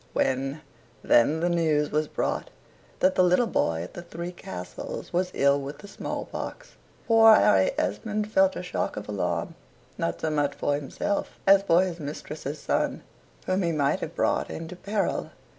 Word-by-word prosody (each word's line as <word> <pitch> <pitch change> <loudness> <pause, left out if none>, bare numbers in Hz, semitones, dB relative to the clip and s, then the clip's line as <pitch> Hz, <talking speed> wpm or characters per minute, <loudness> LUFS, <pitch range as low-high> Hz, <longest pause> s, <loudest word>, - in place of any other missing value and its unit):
When, 135 +3 0 0.4
then, 150 +7 +4
the 175 - +2
news 155 -4 +1
was 150 +1 +1
brought - - -2 0.5
that 185 - +4
the 185 - +4
little 180 +7 +4
boy 85 - 0
at 90 - -10
the - - -7
"Three 170 0 -6
Castles" 90 - -7
was 180 +1 +1
ill 140 0 +3
with 140 +1 -6
the 200 - -12
small 200 - -5
pox, - - -7 0.4
poor 225 -1 +8
Harry - - +4
Esmond 215 -1 -2
felt 190 -2 +4
a - - -5
shock 180 - -3
of 105 - -6
alarm, 90 -5 -2 0.5
not 85 - -1
so 160 - -1
much 145 -2 0
for 145 - 0
himself 145 +8 -3
as 195 0 +7
for 180 -2 +4
his 175 -2 -4
mistress's 150 0 -6
son, - - -1 0.4
whom 185 +1 +1
he 170 -2 +1
might 145 -3 +1
have - - -6
brought - - +1
into 165 +2 -6
peril. 200 +2 -2
165 Hz, 175 wpm, -26 LUFS, 140-185 Hz, 0.5 s, poor